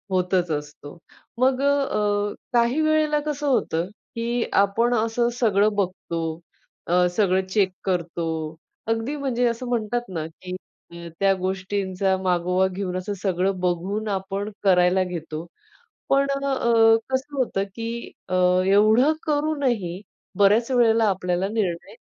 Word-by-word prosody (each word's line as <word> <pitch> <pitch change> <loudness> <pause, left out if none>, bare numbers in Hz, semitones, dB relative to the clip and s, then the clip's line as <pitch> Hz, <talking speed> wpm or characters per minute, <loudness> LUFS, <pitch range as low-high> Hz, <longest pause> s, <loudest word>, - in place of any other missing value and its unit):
होतच 180 -1 +1
असतो. 150 0 -6 0.4
मग 260 +1 +2
अ, 210 -8 +1 0.2
काही 240 +5 +2
वेळेला 310 -1 +2
कसं 295 -1 -2
होतं, 175 -11 +1 0.3
की 235 +1 -1
आपण 225 +5 +2
असं 230 +1 +1
सगळं 210 -2 +3
बघतो. 185 -3 -2 0.7
अ, 180 +1 +4
सगळं 190 -3 +2
चेक 190 -1 +1
करतो. 175 -3 -2 0.6
अगदी 225 +6 -1
म्हणजे 250 -3 0
असं 235 +2 -4
म्हणतात 240 0 -1
ना 165 -4 -4
की 180 +3 -8 0.3
अ, 170 0 -9
त्या 195 0 +4
गोष्टींचा 190 0 -1
मागोवा 180 +1 +1
घेऊन 185 -1 -4
असं 205 +3 -4
सगळं 190 0 0
बघून 185 +5 -1
आपण 195 +1 -3
करायला 180 -1 +4
घेतो. 165 -2 -6 0.6
पण 275 0 +3
अ, 235 -5 +3
कसं 265 +2 -2
होतं 230 -7 0
की 230 -1 -5 0.4
अ, 185 - -2 0.3
एवढं 215 +9 +5
करूनही 280 - 0 0.4
बऱ्याच 210 +5 +4
वेळेला 230 -3 +4
आपल्याला 185 0 -1
निर्णय 195 -6 -2
205 Hz, 125 wpm, -23 LUFS, 185-240 Hz, 0.7 s, एवढं